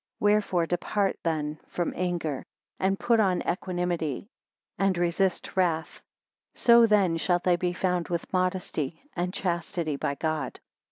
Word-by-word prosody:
17 205 0 +4
Wherefore 190 -5 +1
depart 190 +3 0
then 155 -2 -2
from 175 - -2
anger, 170 -6 -2 0.4
and 195 +1 +1
put 235 -2 +3
on 190 -4 +2
equanimity, 175 -5 -1 0.5
and 195 -2 +2
resist: 175 +2 0
wrath; 170 -4 0 0.5
so 235 -1 +6
then 195 -6 +3
shalt 175 +1 +1 0.2
be 180 0 0
found 180 -1 0
with 170 +1 -4
modesty 180 -5 -1 0.2
and 180 0 -1
chastity 170 -4 -2
by 140 - -1
God. 155 -3 -2
175 Hz, 130 wpm, -27 LUFS, 165-190 Hz, 0.5 s, so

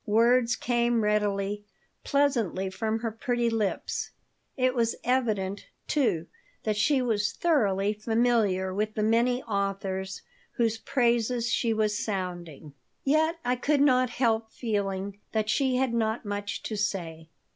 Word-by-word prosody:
Words 235 +3 +4
came 240 -2 +1
readily, 205 -1 0 0.4
pleasantly 235 - +1
from 220 +3 -2
her 230 -2 -2
pretty 235 +1 -1
lips. 215 -3 -2 0.5
It 255 -1 +2
was 230 -2 +1
evident, 215 -6 0 0.2
too, 215 - +1 0.4
that 215 -1 0
she 260 +5 +2
was 215 -4 0
thoroughly 210 - +2
familiar 215 -4 +1
with 215 +2 -2
the 215 - 0
many 235 +3 +2
authors 195 -2 -3 0.3
whose 225 -1 0
praises 235 -1 +1
she 230 - +1
was 215 -1 0
sounding. 175 -7 -5 0.3
Yet 315 +4 +2
I 250 +1 +2
could 280 +3 +1
not 255 -3 +4
help 225 -2 0
feeling 200 -3 -3
that 215 -1 +1
she 265 +1 +2
had 255 -1 +1
not 225 0 0
much 205 0 -4
to 220 - -4
say. 170 -6 -3
220 Hz, 135 wpm, -27 LUFS, 200-245 Hz, 0.5 s, Words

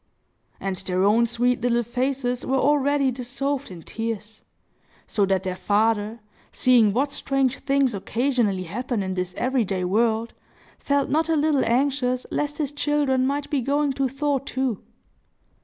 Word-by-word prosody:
And 195 -1 -3
their 185 0 -1
own 225 +4 +4
sweet 245 +1 0
little 240 -1 +2
faces 250 +1 -2
were 270 - 0
already 285 -1 +2
dissolved 275 +3 -3
in 175 -3 -10
tears; 220 0 -5 0.6
so 200 -2 +1
that 190 -1 +1
their 185 -1 -3
father, 215 +2 0 0.3
seeing 240 -5 +4
what 275 +7 0
strange 270 -2 0
things 275 -3 +1
occasionally 225 -2 0
happen 225 +4 -3
in 190 0 -3
this 180 -1 -3
every 255 0 +1
day 190 -2 -2
world, 220 +4 +1 0.5
felt 280 -1 0
not 320 +3 +1
a 325 - +3
little 300 -2 +2
anxious 255 0 +1
lest 295 0 -2
his 295 -3 -2
children 290 -3 +1
might 285 +1 -2
be 285 -3 +1
going 285 +2 +1
to 270 0 0
thaw 280 +1 0
too! 260 -4 -2
250 Hz, 155 wpm, -24 LUFS, 215-275 Hz, 0.6 s, own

